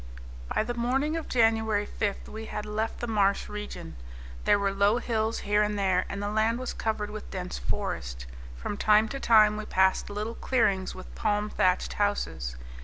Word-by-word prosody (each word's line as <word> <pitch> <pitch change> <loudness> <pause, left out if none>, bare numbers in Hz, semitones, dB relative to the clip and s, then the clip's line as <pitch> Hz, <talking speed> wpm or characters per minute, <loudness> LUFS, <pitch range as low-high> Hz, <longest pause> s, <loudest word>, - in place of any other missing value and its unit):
By - - +2
the 240 +2 -3
morning 265 +6 0
of 325 - -4
January 220 -3 +2
5 205 -1 -3
we 220 +1 -7
had 210 - -5
left 215 +1 -3
the - - -1
marsh 200 -3 +2
region. 210 - -7 0.5
There - - +5
were 200 -1 0
low 200 +3 +3
hills 225 -2 -1
here 205 +1 +3
and 210 0 0
there, 190 -2 +2
and 200 +1 -4
the 205 - -1
land 220 +2 +2
was 255 0 -4
covered 210 -2 -2
with 215 0 -7
dense 180 -1 -5
forest. - - -3 0.3
From 205 - -4
time 215 +1 +4
to 275 - -4
time 215 -4 +5
we 215 - -5
passed 190 -1 +2
little 210 +3 -3
clearings 200 -8 +1
with 185 - -10
palm 210 -1 0
thatched 180 0 +1
houses. 200 - -1
210 Hz, 180 wpm, -28 LUFS, 200-225 Hz, 0.5 s, There